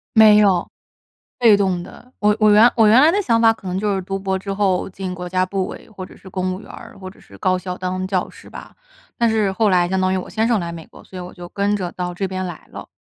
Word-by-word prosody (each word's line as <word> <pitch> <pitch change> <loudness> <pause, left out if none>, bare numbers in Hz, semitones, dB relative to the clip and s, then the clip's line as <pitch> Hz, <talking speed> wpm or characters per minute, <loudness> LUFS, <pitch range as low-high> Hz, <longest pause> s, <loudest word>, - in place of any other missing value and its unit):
没 215 -1 +7
有， 190 -4 +2 0.7
被 225 -4 +6
动 190 -3 0
的。 245 +7 -14
我 210 0 +3
我 215 -1 +5
原 220 +4 +7
我 225 -2 +4
原 235 +5 +6
来 310 - +6
的 405 +2 +1
想 230 -9 +1
法 225 -1 +5
可 215 - -19
能 185 +1 -2
就 205 -1 0
是， 190 - -2
读 195 +1 -4
博 190 0 -2
之 195 +1 -5
后 195 -2 0
进 185 -1 -6
国 180 0 -6
家 185 0 +1
部 190 0 -3
委， - - -10
或 190 -3 -9
者 - - -16
是 190 - -14
公 185 0 -2
务 185 - -7
员 - - -14
儿， - - -12
或 185 -1 -8
者 195 - -18
是 - - -17
高 185 -1 +1
校 180 0 -6
当 185 0 -3
教 185 -1 -2
师 - - -15
吧。 - - -12 0.4
但 235 -2 +2
是 215 -3 +1
后 215 0 +2
来 175 -1 +3
相 190 +1 -1
当 185 0 +1
于 - - 0
我 185 - -6
先 220 +2 -1
生 230 -4 +2
来 170 -1 -4
美 165 -2 -9
国， - - -16
所 190 - -15
以 - - -6
我 180 - -9
就 175 -1 -10
跟 200 +1 0
着 180 -3 -4
到 180 -1 -4
这 195 +2 -3
边 185 0 -4
来 175 -3 -9
了， - - -9
190 Hz, 310 characters per minute, -20 LUFS, 185-210 Hz, 0.7 s, 没